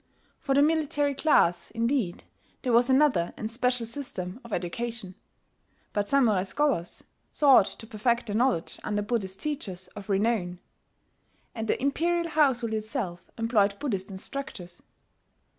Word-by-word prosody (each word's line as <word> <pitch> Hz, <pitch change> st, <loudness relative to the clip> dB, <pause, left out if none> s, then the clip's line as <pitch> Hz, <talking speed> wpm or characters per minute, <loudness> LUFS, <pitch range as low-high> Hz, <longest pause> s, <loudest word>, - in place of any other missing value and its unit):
For 275 Hz, -2 st, 0 dB
the 285 Hz, -, +6 dB
military 295 Hz, -2 st, +1 dB
class 175 Hz, -, +3 dB
indeed 230 Hz, -5 st, -1 dB, 0.4 s
there 250 Hz, -3 st, +1 dB
was 240 Hz, +2 st, +4 dB
another 260 Hz, -, +3 dB
and 215 Hz, 0 st, -4 dB
special 250 Hz, 0 st, 0 dB
system 225 Hz, -6 st, -5 dB
of 235 Hz, -, -12 dB
education; 225 Hz, +2 st, -4 dB, 0.8 s
but 205 Hz, -1 st, -1 dB
Samurai 235 Hz, -9 st, +4 dB
scholars 210 Hz, -, -1 dB, 0.3 s
sought 275 Hz, -9 st, +6 dB
to -, -, -8 dB
perfect 235 Hz, +3 st, 0 dB
their 210 Hz, -2 st, -3 dB
knowledge 240 Hz, -7 st, +1 dB
under 210 Hz, -1 st, -1 dB
Buddhist 200 Hz, -4 st, -2 dB
teachers 200 Hz, -12 st, -4 dB
of 205 Hz, 0 st, -11 dB
renown; 195 Hz, -3 st, +1 dB, 1.0 s
and 225 Hz, -1 st, -4 dB
the -, -, +1 dB
imperial 335 Hz, +5 st, 0 dB
household 260 Hz, -8 st, +2 dB
itself 215 Hz, -5 st, -4 dB
employed 215 Hz, -3 st, +2 dB
Buddhist 200 Hz, -9 st, -3 dB
instructors. 190 Hz, -3 st, -7 dB
230 Hz, 130 wpm, -27 LUFS, 195-270 Hz, 1.0 s, the